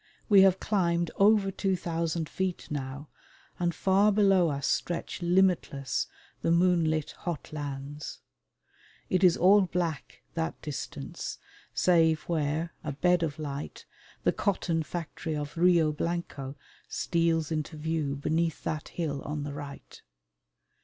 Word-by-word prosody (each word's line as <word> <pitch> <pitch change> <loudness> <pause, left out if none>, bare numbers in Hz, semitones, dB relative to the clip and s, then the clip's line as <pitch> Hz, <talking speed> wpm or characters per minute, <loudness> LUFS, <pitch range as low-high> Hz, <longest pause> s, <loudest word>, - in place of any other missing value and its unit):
We 200 -2 +8
have 190 -1 +5
climbed 170 -4 +1
over 200 -1 +5
two 190 0 0
thousand 165 -2 -2
feet 185 -1 -3
now, 140 +1 -5 0.5
and 175 -1 +1
far 195 +2 +4
below 195 -4 +4
us 140 -1 -2
stretch 175 +1 -1
limitless 175 -6 +1 0.3
the - - 0
moonlit 170 -3 +3
hot 170 -3 -5
lands. 145 0 -6 0.9
It 185 0 +2
is 180 -2 +6
all 195 +4 +6
black, 175 -5 -3
that 165 -1 -2
distance, 150 -3 -5 0.4
save 160 -3 +4
where, 160 0 -1
a 150 - -3
bed 180 +4 +3
of 160 -3 -2
light, 145 -2 -6 0.4
the - - +3
cotton 175 -5 0
factory 160 -1 -4
of 145 0 -4
Rio 170 -2 +4
Blanco 150 -4 -3 0.3
steals 165 -2 +1
into 155 0 -3
view 155 -2 -1
beneath 160 +3 -1
that 155 -1 -3
hill 145 -5 -3
on 150 0 -4
the 145 0 -5
right. 145 -1 -9
165 Hz, 130 wpm, -29 LUFS, 150-180 Hz, 0.9 s, We